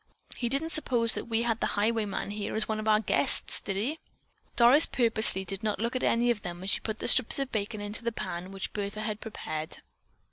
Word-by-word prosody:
"He 240 - -3
didn't 295 +6 +1
suppose 240 -8 +2
that - - -4
we 230 0 -1
had 230 -1 -1
the - - -2
highwayman 210 -2 -1
here 205 0 -4
as 220 -1 0
one 220 -1 -2
of 215 - -5
our 215 -1 +4
guests, 220 - +5
did 195 - -4
he?" 260 +11 -2 0.6
Doris 255 +6 +6
purposely 225 -5 +2
did 195 +1 -4
not 215 -2 -2
look 235 +3 -2
at 255 - -1
any 240 +1 +2
of 220 -3 -3
them 175 -1 -7
as 195 - -1
she - - +1
put 220 -1 -5
the - - -4
strips 245 -1 +3
of 275 -1 -3
bacon 210 0 -3
into 205 +3 -7
the 235 - -1
pan 180 -4 -6
which 195 -1 -6
Bertha 205 +1 -4
had 215 0 -4
prepared. 155 -8 -5
220 Hz, 225 wpm, -28 LUFS, 205-235 Hz, 0.6 s, Doris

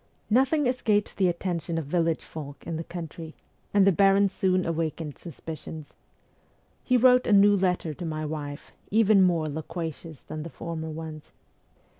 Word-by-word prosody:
Nothing 270 +5 +3
escapes 220 -5 +1
the 190 - +2
attention 170 -1 -2
of 160 - -2
village 165 +1 0
folk 145 -3 -9
in 165 - -3
the 165 - -3
country, 165 -1 -8 0.4
and 200 -1 +5
the 195 - +6
baron 195 +2 +4
soon 185 -1 +1
awakened 160 -2 -2
suspicions. 160 -2 -9 0.9
He 255 - +3
wrote 250 +1 +5
a - - +2
new 205 0 +6
letter 180 -4 0
to 175 - -8
my 155 -1 -3
wife, 145 -2 -6 0.2
even 215 -2 +5
more 170 -4 +3
loquacious 160 0 -6
than 155 - -7
the 165 - -6
former 160 -1 -6
ones. 155 -1 -8
170 Hz, 155 wpm, -27 LUFS, 160-195 Hz, 0.9 s, the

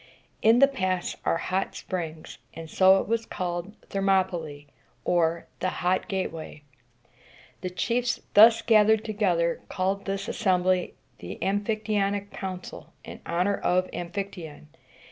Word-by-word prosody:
In 225 +2 +5
the 275 +2 +7
pass 185 -9 -2
are - - +2
hot 185 +3 -2
springs, 165 -4 -6 0.2
and 165 0 -7
so 190 0 +6
it - - -7
was 230 +1 0
called 175 +3 -4 0.2
Ther 195 - -1
mop´y 190 -1 +3
læ, 150 -4 -6 0.4
or 170 -1 +1
the 185 - 0 0.2
Hot 185 +1 +1
Gateway. 165 -6 -4 1.0
The 185 - -3
chiefs 235 +7 -1
thus 225 +2 +7
gathered 220 -1 +4
together 180 -6 0
called 195 +2 -1
this 195 0 -3
assembly 185 -4 +1 0.2
the - - -8
Am 200 +2 0
phic 215 0 -2
ty 215 - -1
on´ic 200 0 0
Council, 185 -2 -7
in - - -10
honor 180 +4 +1
of 185 +1 0
Amphictyon. 175 -4 -6
190 Hz, 145 wpm, -26 LUFS, 175-205 Hz, 1.0 s, the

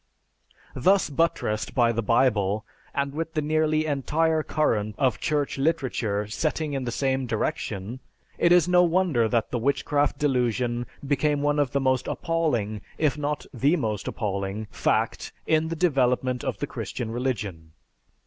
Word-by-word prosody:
Thus 185 +6 +3
buttressed 135 -8 0
by 120 -2 +4
the 115 0 -1
Bible, 110 -3 +2 0.3
and 140 0 -2
with 165 +2 -4
the 155 - +1
nearly 155 0 +1
entire 155 +2 +1
current 110 -10 0
of 130 -5 +1
Church 145 -2 -1
literature 130 -9 0
setting 150 +7 -2
in 135 -2 -2
the 120 - -2
same 130 +1 0
direction, 110 0 -3 0.4
it 170 - +4
is 175 -1 +6
no 180 0 +5
wonder 170 -9 +2
that 115 -1 0
the 120 - -1
witchcraft 145 +3 +1
delusion 120 -3 0 0.2
became 145 +1 +1
one 145 0 +2
of 145 -3 +2
the 140 - 0
most 130 -1 +1
appalling, 120 - -1 0.2
if 150 -3 +2
not 150 0 -3
the 140 +7 +2
most 110 - -2
appalling, 100 0 -3
fact - - 0
in 160 0 +2
the 165 - -3
development 130 -6 +1
of - - -2
the - - -2
Christian 115 -2 -5
religion. 105 -10 -3
135 Hz, 150 wpm, -25 LUFS, 115-155 Hz, 0.4 s, is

